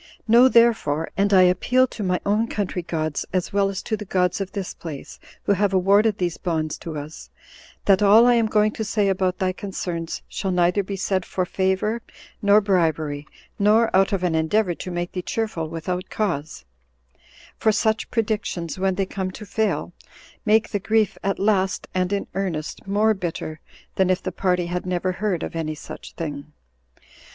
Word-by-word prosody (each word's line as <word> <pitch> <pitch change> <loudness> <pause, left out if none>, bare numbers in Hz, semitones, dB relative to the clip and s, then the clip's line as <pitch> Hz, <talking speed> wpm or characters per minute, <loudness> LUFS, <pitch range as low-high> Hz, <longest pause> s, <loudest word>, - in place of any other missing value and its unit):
Know 235 +3 +7
therefore 230 - +3
[and 200 +1 +2
I 190 -2 +7
appeal 215 +8 +3
to 235 - -8
my 180 -2 0
own 210 +3 +2
country 195 -4 -2
gods, 155 -3 -2
as 185 0 -1
well 200 -1 +2
as 195 -1 -5
to 220 - -1
the 210 - -7
gods 180 -1 0
of 195 - -4
this 195 -3 -4
place, 155 -5 -9 0.2
who - - +1
have 200 0 +2
awarded 200 +3 +4
these 175 -3 -1
bonds 160 -4 -1
to 160 -2 -6
us] 150 +2 -8 0.6
that 195 -1 +4
all 210 +3 +7
I 245 - +6
am 230 -2 +3
going 215 0 +3
to 220 - -4
say 210 -1 +1
about 185 -1 0
thy 185 -1 0
concerns 175 -4 -5
shall 195 - -3
neither 180 +2 +2
be 195 +1 -5
said 190 -1 -1
for 185 0 -2
favor 190 +5 0 0.4
nor 205 +1 +5
bribery, 160 -7 0 0.3
nor 215 +2 +4
out 195 +2 +4
of 195 -3 -1
an 175 -2 +1
endeavor 175 +4 +1
to 185 - -7
make 175 0 -3
thee 180 - -3
cheerful 180 -6 -3
without 180 +3 -4
cause; 165 -8 -3 0.9
for 220 - +3
such 220 0 0
predictions, 205 -7 -2
when 190 0 +1
they 195 +1 0
come 190 0 -3
to 210 +3 -9
fail, 220 +1 -1 0.5
make 220 +1 +4
the 205 - -1
grief 215 +1 +1
at 195 0 0
last, 195 -2 +1
and 185 0 0
in 200 -1 -1
earnest, 175 -3 -4
more 210 +2 +3
bitter 165 -4 -5 0.4
than 190 -1 +3
if 185 0 +1
the - - -2
party 180 -2 0
had 175 +1 -3
never 180 0 0
heard 190 -2 -2
of - - -5
any 155 -1 -2
such - - -10
thing. 150 -2 -6
190 Hz, 185 wpm, -23 LUFS, 175-210 Hz, 0.9 s, Know